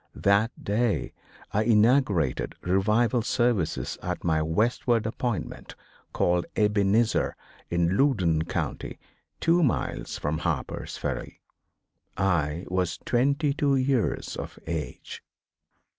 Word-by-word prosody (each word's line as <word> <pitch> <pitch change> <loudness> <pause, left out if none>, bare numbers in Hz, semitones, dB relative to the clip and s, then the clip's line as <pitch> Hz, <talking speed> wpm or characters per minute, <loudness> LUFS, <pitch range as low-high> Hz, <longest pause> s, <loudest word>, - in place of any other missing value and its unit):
That 100 +4 +3
day 110 +2 0 0.4
I 105 - +1
inaugurated 110 - +2
revival 105 +7 +2
services 120 -6 0
at 90 0 -4
my 80 -2 +2
westward 115 +7 +1
appointment 115 0 -4 0.4
called 90 0 +1
"Ebenezer," 105 +1 +2 0.3
in 85 +1 +1
Loudon 95 - +2
County - - -4 0.4
two 170 +2 +3
miles 140 -8 -1
from 75 +2 -2
Harper's 85 -6 -3
Ferry. - - -4 0.8
I 85 -4 0
was 90 -1 -1
twenty 140 +4 +2
two 140 -1 +2
years 130 -3 0
of - - -7
age. 80 -2 -5
105 Hz, 100 wpm, -26 LUFS, 85-120 Hz, 0.8 s, That